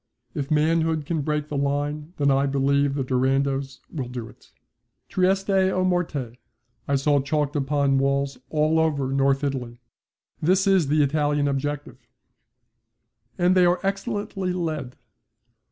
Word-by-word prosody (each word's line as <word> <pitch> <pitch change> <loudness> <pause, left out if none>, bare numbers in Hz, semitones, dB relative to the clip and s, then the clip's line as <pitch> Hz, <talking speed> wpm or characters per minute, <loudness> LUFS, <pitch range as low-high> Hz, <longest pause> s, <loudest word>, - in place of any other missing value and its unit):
If 140 -1 -4
manhood 160 0 +1
can 160 0 -1
break 150 0 -2
the 150 - -4
line, 145 +3 -2
then 140 -1 +3
I 135 +1 +2
believe 140 +1 +1
the 140 - -1
Durandos 135 +1 0
will 135 -6 -3
do 120 -2 -6
it. - - -18 0.6
'Trieste 190 +2 +1 0.2
o 185 - 0
morte!' 150 -10 -1 0.5
I 140 - +1
saw 140 +1 +2
chalked 145 +1 -1
upon 140 -1 +1
the 135 - +1
walls 140 -1 0
all 155 +1 +2
over 145 -5 0
North 135 +1 +2
Italy. 125 -4 -3 0.6
That 185 +5 +3
is 190 -6 +3
the 150 +1 +3
Italian 145 0 +1
objective. 140 -2 -3 1.4
And 180 0 +3
they 180 -1 +5
are 175 +1 +2
excellently 195 -1 -2
led. 155 -8 -3
145 Hz, 140 wpm, -24 LUFS, 135-160 Hz, 1.4 s, they